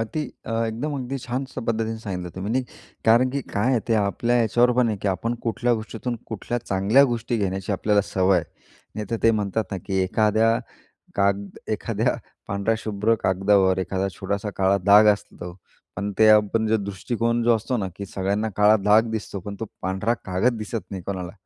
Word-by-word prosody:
अति 115 +8 -3 0.3
अ, - - -5
अगदी 115 0 0
एकदम 145 +5 -3
अगदी 130 +1 -4
छान 125 +2 -2
स 130 - -15
पद्धतीने 115 0 -1
सांगितलं 90 -3 -4
तुम्ही, 100 +4 -3
नाही 130 +1 +1 0.4
कारण 120 +3 +5
की 140 +2 -2
काय 105 +6 +2
आहे, 125 -3 +2
ते 115 - +3
आपल्या 115 +4 0
याच्यावर 120 +2 +3
पण 125 -2 +4
आहे 110 - -1
की 100 - +1
आपण 115 +5 -1
कुठल्या 120 +1 +1
गोष्टीतून, 115 +2 -5
कुठल्या 115 +2 -3
चांगल्या 100 +7 +4
गोष्टी 115 0 -2
घेण्याची 95 -1 -2
आपल्याला 105 +1 +2
सवय 95 -1 +2
आहे. 85 - -4 0.5
नाहीतर 105 +1 -3
ते 115 - +6
म्हणतात 105 0 -1
ना, - - -1
की 95 -1 +1
एखाद्या 110 +4 +2 0.6
काग 100 0 +1 0.2
एखाद्या - - 0 0.3
पांढऱ्या 100 +2 0
शुभ्र 110 0 0
कागदावर 95 0 +3
एखादा 95 +1 -1
छोटासा 100 +2 -2
काळा 95 +1 +3
दाग 105 +2 +7
असतो, 90 -3 -8 0.4
पण 100 +2 -3 0.2
आपला 105 +1 +3
जो 110 - +3
दृष्टिकोन 115 +4 -1
असतो 115 +4 -2
ना, 100 -5 -2
की 100 - -6
सगळ्यांना 100 +3 -1
काळा 105 +1 +6
दाग 110 +2 +4
दिसतो, 105 -2 -4
पण 100 +2 -7
तो 115 - -3 0.2
पांढरा 95 +5 0
कागद 100 +7 +1
दिसत 110 -3 -5
नाही 95 -2 -6
कोणाला. 95 -3 -4
105 Hz, 180 wpm, -24 LUFS, 100-115 Hz, 0.6 s, दाग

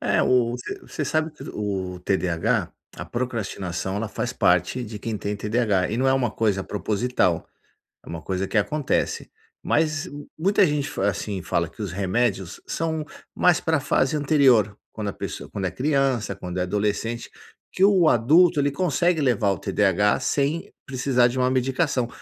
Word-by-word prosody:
É - - +2
o 120 -2 +3
você 125 0 -6
você 155 - -5
sabe 155 +2 0
que 150 - -13
o 95 -3 -3
TDH, 95 +2 0 0.3
a - - -6
procrastinação, 100 -6 -3
ela 110 0 -2
faz 120 +4 -3
parte 90 +8 +2
de 105 -1 -7
quem 110 0 -3
tem 100 +1 -3
TDH 105 -3 +1
e 110 - -1
não 130 +2 +1
é - - +4
uma 125 -4 +1
coisa 105 -4 0
proposital, 105 -4 0 0.6
é - - -12
uma 85 -1 -6
coisa 95 +2 -2
que 110 - +1
acontece. 145 +7 -1 0.3
Mas 155 -1 0 0.3
muita 195 +3 +4
gente 145 -1 -1
f 145 - -6
assim, 100 0 -1
fala 85 -1 0
que 85 - -10
os 100 -4 -4
remédios 100 0 -1
são 160 -2 -2 0.3
mais 180 -2 +4
pra 160 -3 +1
fase 135 +1 +1
anterior, 135 -8 +4 0.2
quando 105 -2 -4
a - - -2
pesso - - -6
quando 95 -2 -3
é - - -1
criança, 135 - 0
quando 90 -1 -6
é - - +1
adolescente, 105 +4 -2 0.4
que 190 - +2
o 190 -5 +5
adulto 150 +8 +5
ele 145 0 +2
consegue 175 +1 +1
levar 120 -7 +2
o 90 - -4
TDH 100 +5 +2
sem 145 +4 -1
precisar 130 -2 +2
de 125 +2 -4
uma 125 0 +2
medicação. 130 0 0
120 Hz, 175 wpm, -24 LUFS, 100-140 Hz, 0.6 s, o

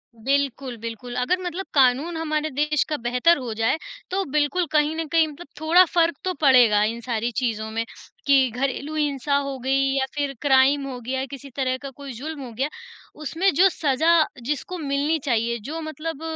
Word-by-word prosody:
बिल्कुल, 270 +1 -1
बिल्कुल 230 +2 -7
अगर 360 +9 +1
मतलब 360 +2 -4
कानून 280 +5 +3
हमारे 310 -1 -1
देश 300 +1 +1
का 300 - -1
बेहतर 250 +8 +3
हो 245 -5 -5
जाए, 225 +7 +1 0.3
तो 385 +1 0
बिल्कुल 300 +4 +1
कहीं 300 +1 +2
न 325 0 -2
कहीं 325 0 +3
मतलब 305 +3 -11
थोड़ा 330 +4 +6
फ़र्क 335 -2 +1
तो 370 - -1
पड़ेगा 245 -7 +6
इन 230 +2 -2
सारी 235 0 -2
चीज़ों 220 -3 -2
में 225 +1 -2 0.4
कि 270 -2 +5
घरेलू 275 +5 -3
हिंसा 285 -2 0
हो 275 -1 -3
गई 265 +2 +1 0.2
या 265 - +2
फिर 285 -1 -1
क्राइम 275 0 +4
हो 255 -2 -6
गया, 260 +3 -2
किसी 275 0 -10
तरह 260 -2 0
का 275 +1 -8
कोई 275 0 -9
जुल्म 290 +4 -6
हो 240 - -9
गया, 270 +6 -1 0.5
उसमें 330 +6 0
जो 380 +3 +6
सज़ा 320 +2 +3 0.2
जिसको 295 +7 -3
मिलनी 290 +1 0
चाहिए, 235 -2 +1
जो 305 +10 -6
मतलब 315 -1 -5
280 Hz, 185 wpm, -23 LUFS, 250-310 Hz, 0.5 s, थोड़ा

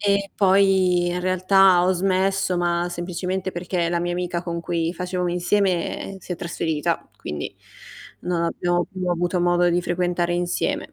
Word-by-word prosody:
e 200 -1 +1
poi, 190 -2 +3
in 180 +1 -2
realtà, 185 0 +4
ho 185 - +3
smesso, 190 0 +1
ma 175 0 0
semplicemente 180 +2 -3
perché 175 -1 -2
la 170 0 0
mia 175 0 -2
amica 175 -1 -2
con 170 -1 -4
cui 165 0 -1
facevamo 180 0 -2
insieme, 180 +1 0
ehm, - - -8
si 185 - -7
è - - -4
trasferita, 165 -3 -2
quindi 75 0 -6 0.7
non 175 -1 -1
abbiamo 175 +1 0
più 185 -2 -4
avuto 175 +1 0
modo 175 0 +3
di 175 +1 +2
frequentare 175 0 -1
insieme. 175 0 -2
175 Hz, 160 wpm, -23 LUFS, 175-185 Hz, 0.7 s, realtà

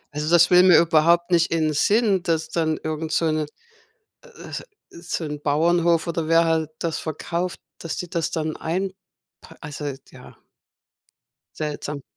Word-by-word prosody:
Also, 150 +1 -2
das 170 +1 +5
will 180 0 +8
mir 180 -3 +7
überhaupt 170 +2 +3
nicht 170 -1 +3
in 160 -2 +1
Sinn, 205 +4 +2
dass 160 -2 -1
dann 160 -2 0
irgend 155 0 -4
so 165 - +1
'ne 155 -1 -1 0.8
äh, 485 -2 -13 0.4
so 170 0 -5
'n 150 -1 -5
Bauernhof 170 +3 +2
oder 165 -1 -2
wer 165 +1 +4
halt 160 -1 0
das 165 -2 -2
verkauft, 170 +3 -4 0.2
dass 165 - -5
die 180 - -6
das 165 -1 -2
dann 155 -1 -2
einpa 185 +4 -2 0.7
also 145 -2 -5 0.2
ja. - - -15 1.2
Seltsam. 150 -2 -4
165 Hz, 150 wpm, -23 LUFS, 155-175 Hz, 1.2 s, will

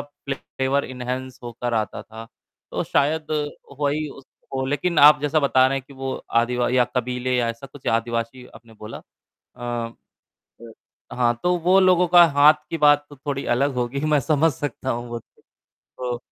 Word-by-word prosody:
Flavour 140 -1 -3
enhance 130 0 -5
होकर 120 0 -4
आता 110 -2 -2
था, 115 0 -11 0.4
तो - - -2
शायद 155 +2 0 0.5
वही 145 +2 0 0.5
हो, 130 0 -1
लेकिन 150 +5 0
आप 150 0 +8
जैसा 150 +2 +1
बता 130 -2 +4
रहे 135 +1 0
हैं - - -9
कि 140 - -15
वो 135 0 -4 0.2
आदि 120 +1 +2 0.2
या 125 - +5
कबीले 125 +1 -1
या 120 -1 +1
ऐसा 115 +4 -6
कुछ 135 0 -15
आदिवासी 115 +2 -2
आपने 115 0 -16
बोला 110 +1 -9 0.6
अ 120 - -12 1.0
अ, 115 -1 -15
हाँ, 120 -1 +2
तो 180 0 +2
वो 180 +3 +4
लोगों 180 -1 +4
का 175 0 +8
हाथ 150 +2 +8 0.2
की 165 - -3
बात 145 -1 +5
तो 145 - -12
थोड़ी 140 0 -4
अलग 140 +2 0
होगी 125 +2 -2
मैं 150 -1 +3
समझ 155 +3 +2
सकता 130 -1 -4
हूँ 120 0 -3
वो 120 0 -4
तो। - - -25 0.4
तो 125 -1 -6
130 Hz, 175 wpm, -22 LUFS, 120-145 Hz, 1.0 s, आप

